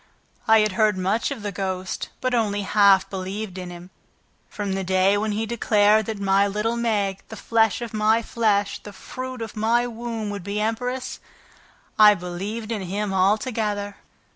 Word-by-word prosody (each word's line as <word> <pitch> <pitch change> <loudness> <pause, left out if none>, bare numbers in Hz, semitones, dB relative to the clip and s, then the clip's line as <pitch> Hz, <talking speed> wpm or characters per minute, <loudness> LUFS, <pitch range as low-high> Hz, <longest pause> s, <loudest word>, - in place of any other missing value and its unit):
I 220 0 +6
had 215 0 +1
heard 215 0 +2
much 195 +5 0
of 265 -7 -6
the 205 - -3
ghost, 190 -1 -4
but 255 -1 0
only 205 -4 0
half 200 -1 +4
believed 190 0 -5
in 180 -1 -6
him. 175 +1 -11 0.6
From 200 -2 -3
the 195 0 -2
day 190 +2 +3
when 210 +1 -1
he 220 +2 -1
declared 215 -2 +3
that 220 -2 -4
my 195 0 +3
little 210 +3 -1
Meg, 205 -5 -1
the 220 - -7
flesh 225 +1 +1
of 235 - -7
my 220 +2 +2
flesh, 210 -3 0
the 205 - -10
fruit 255 +4 -7
of 225 0 -8
my 230 +3 +2
womb, 230 -2 -4
would 200 -3 -6
be 200 +2 -3
empress, 250 +4 -2 0.8
I 210 -1 +8
believed 200 +6 -5
in 215 -3 -2
him 195 +2 -3
altogether." 205 +1 0
210 Hz, 170 wpm, -23 LUFS, 195-225 Hz, 0.8 s, I